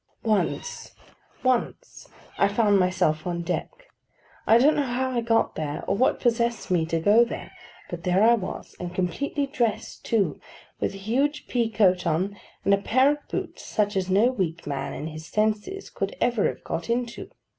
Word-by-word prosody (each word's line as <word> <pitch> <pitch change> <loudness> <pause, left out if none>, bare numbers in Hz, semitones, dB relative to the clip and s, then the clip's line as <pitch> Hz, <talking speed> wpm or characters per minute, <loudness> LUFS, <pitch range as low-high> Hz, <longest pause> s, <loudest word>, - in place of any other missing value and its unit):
Once—once—I 255 -5 -1
found 205 -1 +3
myself 180 -4 +1
on 170 -1 -2
deck. 175 +1 -2 0.8
I 225 - +7
don't 285 +6 +5
know - - +2
how 260 -1 -1
I 240 -2 0
got 230 0 +2
there, 150 -2 -4
or - - +1
what 250 +6 +2
possessed 235 -3 0
me 165 -3 +2
to 165 0 0
go 210 +8 +5
there, 235 - -6 0.4
but 170 -1 -7
there 185 +3 +3
I 230 +2 +7
was; 205 -6 -4
and 180 0 -6
completely 280 - -1
dressed 240 -5 -2
too, 200 -10 0 0.4
with - - -1
a 195 0 -10
huge 285 +6 0
pea 235 -2 0
coat 185 -5 +3
on, 180 +5 0 0.3
and 200 - +4
a 200 - +4
pair 260 +7 +4
of 295 0 -5
boots - - -4
such 205 -1 -1
as 190 -1 -1
no 210 +7 +4
weak 170 -8 -3
man 140 -2 -3
in 140 - -5
his 155 0 -7
senses 215 - -1
could - - -3
ever 240 -4 +2
have - - -5
got 165 +6 -4
into. 235 0 -2
210 Hz, 175 wpm, -25 LUFS, 180-240 Hz, 0.8 s, I